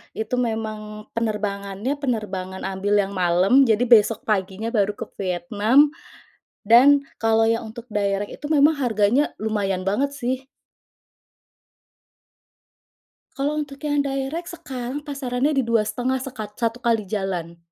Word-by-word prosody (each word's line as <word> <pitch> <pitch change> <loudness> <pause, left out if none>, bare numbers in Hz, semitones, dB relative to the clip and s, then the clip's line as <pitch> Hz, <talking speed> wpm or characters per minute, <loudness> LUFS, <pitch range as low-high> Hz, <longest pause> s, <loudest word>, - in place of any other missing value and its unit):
itu 220 +3 -2
memang 215 -2 -4
penerbangannya 210 +3 -2
penerbangan 195 -8 -3
ambil 195 +2 -1
yang 195 - -6
malam, 185 +8 +4
jadi 220 +2 +3
besok 225 -2 +4
paginya 205 +1 -1
baru 205 -2 +1
ke - - -5
Vietnam 215 +9 +2 0.7
dan 270 +6 +6 0.2
kalau 225 0 +3
yang 230 0 0
untuk 235 +2 -10
direct 200 0 -1
itu - - -9
memang 300 +1 +5
harganya 240 +2 +2
lumayan 200 -4 -1
banget 255 +9 0
sih. 260 0 -3 2.9
Kalau 295 +2 -1
untuk 280 -2 -6
yang 290 -1 +1
direct 280 +5 -3
sekarang 265 -3 -6
pasarannya 275 -1 -1
di - - +2
Rp2.500.000 230 +3 0
sekat 215 -6 -7
1 230 0 -1
kali 230 -3 +1
jalan. 185 -4 -4
225 Hz, 120 wpm, -23 LUFS, 205-265 Hz, 2.9 s, dan